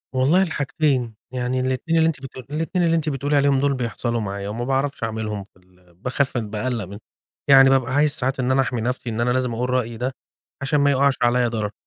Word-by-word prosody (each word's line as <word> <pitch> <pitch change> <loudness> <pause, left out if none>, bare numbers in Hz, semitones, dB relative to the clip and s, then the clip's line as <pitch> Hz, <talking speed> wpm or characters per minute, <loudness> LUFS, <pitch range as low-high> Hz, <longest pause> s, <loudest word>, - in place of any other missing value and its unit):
والله 145 +9 +4
الحاجتين، 140 - -1 0.2
يعني 125 0 -1
الإتنين 130 +6 0
اللي 160 0 +4
أنتِ 155 -5 -2
بت 135 - -9
الإتنين 160 +7 -2
اللي 165 0 +3
أنتِ 160 -1 0
بتقولي 145 +1 -1
عليهم 140 -1 +3
دول 140 +1 +2
بيحصلوا 120 -1 -2
معايا 100 -1 -4
وما 115 +3 -4
باعرفش 135 0 -1
أعملهُم 110 -2 -3
في 95 - -25
ال 90 -1 -26
باخاف 130 +7 -1
بأقلق 110 +1 -2
منهُم، 100 +3 -10 0.5
يعني 135 -1 +8
بابقى 130 -1 +2
عايز 145 +1 +3
ساعات 135 -2 -2
إن 130 0 +1
أنا 135 +1 +4
أحمِي 125 -3 -2
نفْسي 125 +1 -2
إن 115 +1 -2
أنا 120 - +1
لازم 125 -1 0
أقول 125 +2 -2
رأيي 120 -2 -1
ده 125 +3 -2 0.5
علشان 140 +2 +1
ما 140 0 +4
يوقعش 140 0 +3
عليا 120 0 +3
ضرر 110 -3 -2
130 Hz, 210 wpm, -22 LUFS, 115-140 Hz, 0.5 s, يعني